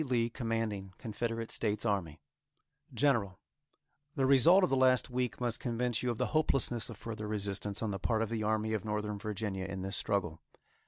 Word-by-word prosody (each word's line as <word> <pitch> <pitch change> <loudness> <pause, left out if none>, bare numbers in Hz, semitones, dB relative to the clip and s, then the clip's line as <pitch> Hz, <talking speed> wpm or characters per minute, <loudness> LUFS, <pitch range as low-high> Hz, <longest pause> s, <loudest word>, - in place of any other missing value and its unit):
Lee, 120 -4 0
Commanding 115 -5 -3
Confederate 115 +1 -4
States 105 0 -1
Army:_ 95 -8 -1 0.7
GENERAL: 115 -10 +1 0.8
The 135 -3 +2
result 140 +9 +6
of 180 - +2
the - - +4
last 130 -1 +3
week 125 -4 -2
must 120 -2 -1
convince 120 -1 -1
you 125 - -1
of 120 - -2
the - - +1
hopelessness 135 -7 +2
of 115 - -8
further 110 -1 -6
resistance 100 0 -2
on 110 - -1
the 95 - -4
part 110 +3 +1
of 110 - -3
the 115 -1 -2
Army 110 +1 0
of 105 -4 -1
Northern 105 -1 -3
Virginia 105 -3 -3
in 95 -1 -5
this 95 +1 -1
struggle. 85 -6 0
110 Hz, 180 wpm, -32 LUFS, 100-120 Hz, 0.8 s, result